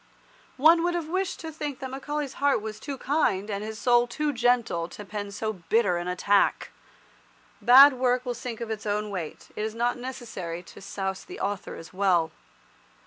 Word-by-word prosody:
One 325 +5 +6
would 350 0 +1
have 335 -3 -2
wished 375 +1 -1
to 320 - -6
think 295 -3 -5
that 260 -1 -6
Macaulay's 285 +1 -4
heart 285 -3 +3
was 215 0 -6
too 280 -2 -5
kind, 220 -9 0
and 200 +1 -3
his 220 0 -6
soul 240 0 +3
too 295 +4 -1
gentle, 235 -9 +1
to 210 - -9
pen 205 0 -5
so 215 +2 -3
bitter 190 0 +1
an 175 +1 -4
attack. 200 +3 +2 0.9
Bad 270 +4 +9
work 250 0 +1
will 245 - -1
sink 235 -1 -6
of 230 -1 -4
its 215 0 -5
own 210 0 -1
weight. 175 -6 -6
It - - -4
is 220 0 -3
not 240 +1 0
necessary 225 -10 -6
to - - -13
souse 190 -1 -4
the - - -10
author 200 -1 -3
as 165 +1 -11
well. 185 -4 +2
230 Hz, 190 wpm, -27 LUFS, 200-265 Hz, 0.9 s, Bad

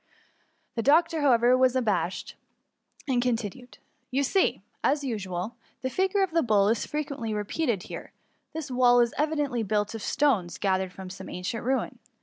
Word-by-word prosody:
*' - - -42
The 230 - 0
doctor, 320 +5 +3
however, 245 -3 +5
was 255 0 +3
un 260 - +2
abashed, 200 -4 -1 0.7
and 250 -3 +2
continued: 240 0 -2
*^ - - -16 0.3
You 270 +2 +1
see, 380 +8 +1 0.2
as 290 0 +2
usual, 210 -3 -4 0.3
the 260 - -1
figure 380 +4 +2
of 380 - -1
the 330 0 +3
bull 210 -5 +3
is 225 0 0
frequently 280 -7 -3
repeated 210 - -1
here. - - -8 0.4
This 310 -4 -5
wall 245 -1 +5
is 235 -1 +3
evidently 295 -5 0
built 210 0 0
of 225 - -6
stones 200 - +1
gathered 190 -1 0
from 185 0 -9
some 190 - -9
ancient 180 +6 -4
ruin. 260 +2 -1
245 Hz, 170 wpm, -27 LUFS, 210-285 Hz, 0.7 s, however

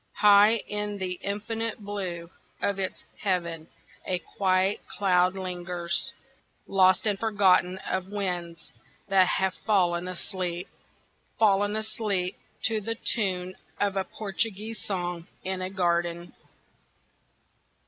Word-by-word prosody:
High 210 +1 +7
in 210 0 -2
the 185 -2 -3
infinite 225 +2 -2
blue 185 -5 -5 0.3
of 200 -1 0
its 190 - -3 0.2
heaven 170 -4 -1 0.4
a 185 - 0
quiet 185 +2 +1
cloud 185 -2 +2
lingers, 180 -1 -2 0.5
Lost 185 0 +4
and 205 -2 +1
forgotten 190 -4 +3
of 185 0 -1
winds 175 -5 -3 0.4
that 190 -1 +5
have 190 +1 +1
fallen 180 -5 +1
asleep, 180 0 -3 0.7
Fallen 205 -1 +3
asleep 215 -4 -1 0.3
to 220 -1 +2
the 225 +3 -2
tune 185 -5 -1 0.2
of 200 -1 +1
a 195 - +1
Portuguese 215 +2 -3
song 175 -3 -3 0.2
in 190 0 -2
a 185 - -2
garden. 175 -2 0
190 Hz, 110 wpm, -27 LUFS, 180-205 Hz, 0.7 s, High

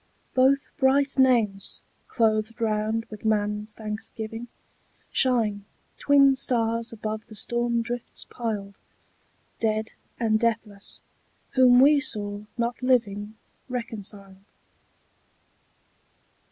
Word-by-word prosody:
Both 270 +2 +3
bright 275 +1 +3
names, 230 -7 +2 0.2
clothed 220 -1 +1
round 220 0 0
with 215 0 -9
man's 210 0 0
thanksgiving, 220 +2 -6 0.6
Shine, 225 -6 +1 0.4
twin 275 -1 +5
stars 230 -2 +1
above 215 -1 -5
the 215 - -12
storm 235 +2 -1
drifts 240 +1 -6
piled, 205 -4 -5 0.8
Dead 220 -1 -1 0.3
and 220 -2 +2
deathless, 215 -3 -2 0.5
whom 250 -1 +6
we 290 +2 +6
saw 205 -6 -2
not 235 +1 -2
living 220 -5 +1 0.3
Reconciled. 205 -5 -6
225 Hz, 90 wpm, -26 LUFS, 210-245 Hz, 0.8 s, whom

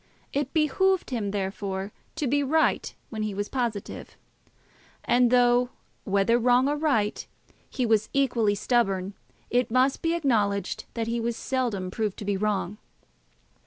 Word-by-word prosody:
It 280 -1 -1
behoved 350 +3 +2
him, 220 -5 -1
therefore, 195 0 -3 0.2
to 315 -2 -2
be 285 +3 +2
right 315 +3 +1 0.2
when 220 -2 -4
he 210 -2 -2
was 205 +1 -3
positive; 235 -6 -4 0.9
and 245 0 +3
though 245 0 +4 0.4
whether 200 +3 +2
wrong 250 +2 +4
or 290 - +1
right 275 -9 0 0.5
he 255 - -1
was 220 -2 +2
equally 235 -7 +2
stubborn, 200 -4 0 0.4
it 245 +1 +2
must 255 +3 +2
be 330 0 +1
acknowledged 205 - 0
that 230 -1 -1
he 235 +1 -1
was 235 0 -2
seldom 230 -9 -2
proved 215 -1 -2
to 205 - -7
be 200 0 0
wrong. 210 0 -1
235 Hz, 145 wpm, -26 LUFS, 205-260 Hz, 0.9 s, though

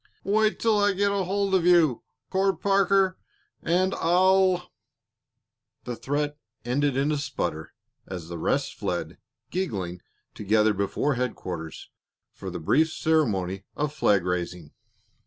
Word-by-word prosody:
"Wait 215 +2 +2
till 220 -2 +2
I 205 0 +3
get 200 +1 +1
hold 195 0 0
of 185 -3 +3
you, 170 -7 +4 0.3
Court 195 0 +1
Parker, 195 -1 +2 0.4
and 185 +3 +1
I'll 185 +1 +3 0.6
" - - -58
The 125 - -4
threat 145 +3 -2 0.3
ended 135 +2 0
in 140 +2 +1
a 150 - 0
sputter 90 - -4 0.3
as 90 -4 -7
the 85 -1 -6
rest - - 0
fled, - - -4 0.3
giggling, 95 - -3 0.3
to - - -8
gather 105 +1 +3
before 100 +8 0
headquarters 90 - -5 0.4
for - - -7
the 90 - -5
brief 155 - +2
ceremony 100 - 0
of 150 0 -2
flag 100 - +2
raising. 90 -3 -3
150 Hz, 135 wpm, -26 LUFS, -, 0.6 s, you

